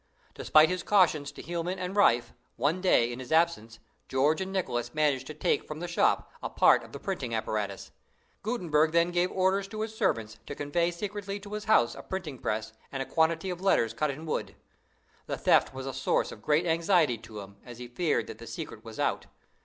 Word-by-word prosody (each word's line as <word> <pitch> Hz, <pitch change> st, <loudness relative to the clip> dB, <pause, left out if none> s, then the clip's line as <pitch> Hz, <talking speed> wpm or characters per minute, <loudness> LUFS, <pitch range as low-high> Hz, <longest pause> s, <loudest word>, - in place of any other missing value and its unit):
Despite 155 Hz, 0 st, +5 dB
his 180 Hz, -1 st, -1 dB
cautions 170 Hz, -8 st, +3 dB
to -, -, -10 dB
Hielman 175 Hz, +3 st, -3 dB
and 180 Hz, +1 st, -4 dB
Riffe, 120 Hz, -, +3 dB, 0.2 s
one 160 Hz, +6 st, 0 dB
day, 120 Hz, -10 st, +3 dB
in 120 Hz, -, -7 dB
his 130 Hz, +2 st, -9 dB
absence, 160 Hz, -9 st, +1 dB, 0.3 s
George 145 Hz, +6 st, +2 dB
and 190 Hz, 0 st, -3 dB
Nicholas 120 Hz, -11 st, -2 dB
managed 145 Hz, -4 st, +1 dB
to 155 Hz, -, -7 dB
take -, -, 0 dB
from 155 Hz, 0 st, -6 dB
the 175 Hz, -, -4 dB
shop 170 Hz, -, +1 dB
a -, -, -3 dB
part -, -, +5 dB
of -, -, -13 dB
the -, -, -8 dB
printing 140 Hz, -, -3 dB
apparatus. 105 Hz, -3 st, -3 dB, 0.5 s
Gutenberg 165 Hz, -9 st, +1 dB
then 170 Hz, +1 st, +3 dB
gave 175 Hz, +1 st, +1 dB
orders 190 Hz, +1 st, +1 dB
to 215 Hz, +1 st, -6 dB
his 220 Hz, 0 st, -3 dB
servants 115 Hz, -, -1 dB
to 145 Hz, -, -5 dB
convey 170 Hz, +5 st, 0 dB
secretly 200 Hz, +2 st, -5 dB
to 205 Hz, +1 st, -9 dB
his 210 Hz, 0 st, -4 dB
house 165 Hz, -, +4 dB
a 140 Hz, -, -9 dB
printing 160 Hz, -6 st, -5 dB
press 110 Hz, +1 st, -3 dB, 0.2 s
and 135 Hz, -1 st, -2 dB
a -, -, -10 dB
quantity 165 Hz, +4 st, +1 dB
of 180 Hz, 0 st, -6 dB
letters 115 Hz, -, +2 dB
cut 150 Hz, +6 st, 0 dB
in 145 Hz, +4 st, -6 dB
wood. 155 Hz, -, -3 dB, 0.7 s
The -, -, -3 dB
theft -, -, +3 dB
was 130 Hz, 0 st, -7 dB
a 135 Hz, -, -4 dB
source 130 Hz, +1 st, 0 dB
of -, -, -11 dB
great 155 Hz, +3 st, +2 dB
anxiety 165 Hz, -, +2 dB
to 110 Hz, -2 st, -9 dB
him, 100 Hz, 0 st, -12 dB
as 120 Hz, -2 st, -10 dB
he 125 Hz, 0 st, -7 dB
feared 155 Hz, +6 st, 0 dB
that 110 Hz, -, -9 dB
the 115 Hz, -, -10 dB
secret 155 Hz, -10 st, -7 dB
was 115 Hz, -1 st, -10 dB
out. -, -, 0 dB
155 Hz, 210 wpm, -29 LUFS, 125-180 Hz, 0.7 s, Despite